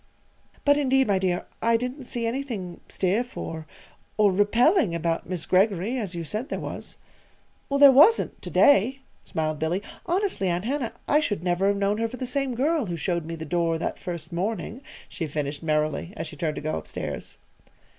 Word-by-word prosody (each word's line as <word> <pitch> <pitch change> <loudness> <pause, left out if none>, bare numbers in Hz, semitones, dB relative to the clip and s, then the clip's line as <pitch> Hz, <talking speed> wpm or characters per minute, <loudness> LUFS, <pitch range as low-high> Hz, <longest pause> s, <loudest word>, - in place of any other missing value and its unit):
"But, 285 0 +5
indeed, 270 -1 +3
my 200 -4 +2
dear, 180 -2 0 0.2
I 230 0 +3
didn't 250 +3 -5
see 240 -2 -3
anything 230 -8 -4
stiff, 215 +7 -1
or 160 -1 -5 0.5
or 210 -2 +5
repelling 220 - +3
about 165 0 -2
Miss 180 -3 -2
Greggory, 195 +4 +2
as 195 -6 -4
you 170 - -3
said 215 - -4
there - - -3
was." - - -6 0.7
"There 280 0 +8
wasn't 315 - +5
to - - -6
day," 265 +1 +4 0.2
smiled 155 -1 -2
Billy. 175 +6 -1 0.2
"Honestly, 365 - 0
Aunt 175 +3 -1
Hannah, 260 -2 -2
I 295 - +4
should 205 - -2
never 180 +2 +1
have 200 0 +2
known 200 +2 +1
her 230 - +1
for 255 - -8
the 255 - -3
same 260 0 -1
girl 290 0 +1
who 170 -1 -3
showed 170 0 -1
me 165 +1 -5
the 160 -1 -7
door 165 0 0
that - - -3
first 170 -3 -6
morning," 215 +6 -3 0.3
she 165 -5 -4
finished 145 -1 -3
merrily, 155 +3 -1
as 160 - -3
she 155 - -9
turned 155 0 -2
to - - -5
go 80 +1 -1
up - - -13
stairs. - - -5
200 Hz, 190 wpm, -25 LUFS, 170-255 Hz, 0.7 s, There